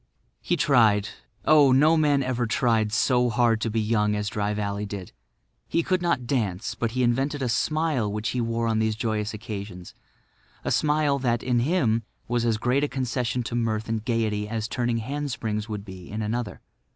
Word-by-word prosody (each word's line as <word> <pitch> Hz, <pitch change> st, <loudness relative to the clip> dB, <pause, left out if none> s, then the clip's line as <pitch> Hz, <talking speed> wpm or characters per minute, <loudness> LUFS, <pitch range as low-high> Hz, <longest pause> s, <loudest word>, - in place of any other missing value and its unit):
He -, -, 0 dB
tried—oh, 120 Hz, -, +3 dB
no 150 Hz, +5 st, +5 dB
man 145 Hz, -3 st, +3 dB
ever 125 Hz, -2 st, -1 dB
tried 110 Hz, -2 st, +1 dB
so 125 Hz, +1 st, +2 dB
hard 120 Hz, -2 st, +2 dB
to 115 Hz, -, 0 dB
be 110 Hz, +1 st, -1 dB
young 105 Hz, -1 st, +1 dB
as 105 Hz, 0 st, -2 dB
Dry 105 Hz, 0 st, -1 dB
Valley 105 Hz, 0 st, -2 dB
did. 100 Hz, -3 st, -7 dB, 0.6 s
He 170 Hz, -, +1 dB
could 185 Hz, +1 st, 0 dB
not 170 Hz, -8 st, 0 dB
dance; 110 Hz, -6 st, -1 dB
but 115 Hz, -1 st, -2 dB
he 130 Hz, 0 st, +1 dB
invented 135 Hz, +4 st, 0 dB
a -, -, 0 dB
smile 145 Hz, -2 st, 0 dB
which 105 Hz, +1 st, -2 dB
he 125 Hz, -, -1 dB
wore 115 Hz, 0 st, -1 dB
on 110 Hz, -1 st, +1 dB
these 110 Hz, -1 st, +1 dB
joyous 110 Hz, -2 st, -2 dB
occasions, 100 Hz, -4 st, -7 dB, 0.7 s
a -, -, 0 dB
smile 150 Hz, -2 st, +2 dB
that, 120 Hz, -3 st, 0 dB
in 125 Hz, -1 st, +1 dB
him, 120 Hz, -5 st, +1 dB, 0.3 s
was 120 Hz, 0 st, 0 dB
as 115 Hz, -2 st, +2 dB
great 125 Hz, +5 st, +1 dB
a -, -, +2 dB
concession 125 Hz, -2 st, -2 dB
to 115 Hz, -, -6 dB
mirth 115 Hz, -2 st, -1 dB
and 110 Hz, -1 st, -2 dB
gaiety 110 Hz, -3 st, -1 dB
as 110 Hz, -1 st, -2 dB
turning 120 Hz, -1 st, -1 dB
hand 145 Hz, +6 st, -3 dB
springs 110 Hz, -3 st, -3 dB
would 105 Hz, -2 st, -5 dB
be 95 Hz, -3 st, -10 dB
in 110 Hz, +2 st, -3 dB
another. 115 Hz, +1 st, -3 dB
115 Hz, 190 wpm, -25 LUFS, 105-130 Hz, 0.7 s, no